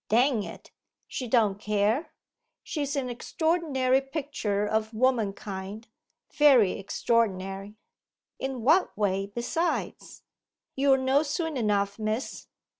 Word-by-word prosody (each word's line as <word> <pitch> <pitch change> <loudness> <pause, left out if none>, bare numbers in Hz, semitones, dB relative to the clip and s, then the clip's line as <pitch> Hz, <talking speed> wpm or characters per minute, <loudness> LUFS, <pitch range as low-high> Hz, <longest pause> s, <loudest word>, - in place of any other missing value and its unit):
Dang 240 +1 +3
it, - - -9 0.4
she 255 - -4
don't 215 -4 +2
care. 210 +7 0 0.5
She's 285 -2 -3
an 270 -3 -1
extraordinary 265 0 +1
picture 270 -8 -2
of 220 +1 -1
womankind 210 -4 -1 0.5
very 260 -10 +6
extraordinary.' 195 -1 -1 0.6
'In 265 -3 -4
what 320 - +3
way 195 -1 0
besides?' 240 +11 -3 0.5
'You'll 270 0 +4
know 265 +2 +3
soon 315 +1 -2
enough, 205 -3 0
miss. 215 +4 -3
235 Hz, 105 wpm, -27 LUFS, 205-275 Hz, 0.6 s, very